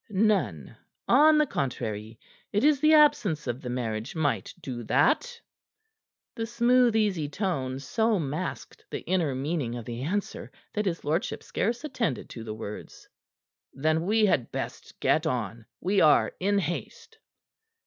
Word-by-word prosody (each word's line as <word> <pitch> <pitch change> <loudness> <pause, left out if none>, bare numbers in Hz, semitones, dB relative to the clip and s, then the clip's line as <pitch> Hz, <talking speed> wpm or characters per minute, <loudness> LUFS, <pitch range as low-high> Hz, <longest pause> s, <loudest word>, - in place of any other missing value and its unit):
"None. 185 - 0 0.3
On 305 +5 +6
the 300 - +4
contrary, 110 - -4 0.3
it 205 - +1
is 295 -2 +4
the 310 +2 +5
absence 290 - +4
of 125 +1 -3
the 125 - -6
marriage 115 0 -3
might 145 - 0
do 125 -3 -6
that." 485 - +2 0.9
The 225 0 -4
smooth, 240 0 +3
easy 190 -9 +1
tone 140 -8 -2
so 220 - +1
masked 155 +2 -4
the - - -4
inner 170 -7 0
meaning 135 -3 -2
of 120 -2 -6
the 120 0 -5
answer 190 +9 -3 0.2
that 210 -1 -1
his 170 -2 -2
lordship 160 +5 -1
scarce 235 +5 -2
attended 235 - -2
to 115 - -7
the 110 -1 -6
words. 105 -1 -8 0.7
"Then 155 +5 0
we 215 +1 +4
had 135 - +1
best - - -6
get 160 +1 +2
on. 115 -4 -3
We 195 +2 +2
are 155 -2 +5
in 200 +2 +1
haste." 200 - -4
165 Hz, 150 wpm, -27 LUFS, -, 0.9 s, On